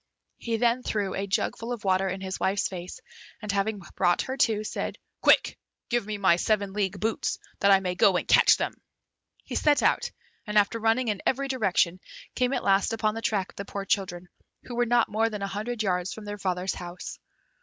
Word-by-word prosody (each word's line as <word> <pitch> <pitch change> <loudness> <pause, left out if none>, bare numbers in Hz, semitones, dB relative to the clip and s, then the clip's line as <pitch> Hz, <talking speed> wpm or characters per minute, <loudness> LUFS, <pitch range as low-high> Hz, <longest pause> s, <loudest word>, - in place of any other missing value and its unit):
He 230 -1 -1
then 240 +2 +2
threw 205 -5 -2
a 195 +1 -3
jugfull 225 +4 -1
of 240 -3 -4
water 190 0 +2
in 190 +1 -4
his 190 0 -4
wife's 195 +1 +1
face, 180 +5 -7 0.4
and 210 -2 -3
having 200 +2 0 0.2
brought 175 - +2
her 260 - -4
to, 220 -5 +2
said, - - -4 0.2
"Quick! - - +4 0.3
give 240 -3 0
me 215 -1 -3
my 190 -4 +4
seven 200 0 0
league 195 -1 -1
boots, 220 +3 -1 0.2
that 200 - +4
I 195 -1 +6
may 180 -1 -1
go 185 0 +4
and - - -3
catch - - +6
them." - - -2 0.7
He - - -8
set 295 -1 +3
out, - - +2 0.4
and 210 0 0
after 210 +3 +3
running 225 +2 +2
in 205 -2 -2
every 275 +1 0
direction, 190 -8 +1 0.3
came 250 0 +1
at - - -1
last 195 +2 +3
upon 215 -1 0
the 225 - -5
track 200 -4 -1
of - - -31
the 200 - -5
poor 200 0 -5
children, 180 -3 -1 0.4
who 245 - -8
were 240 0 +1
not 240 0 +3
more 225 +2 +1
than 210 -2 -5
a - - -1
hundred 215 +3 -3
yards 180 -2 0
from 220 - -9
their 205 0 -6
father's 185 -1 -1
house. 175 0 -8
205 Hz, 210 wpm, -27 LUFS, 190-225 Hz, 0.7 s, I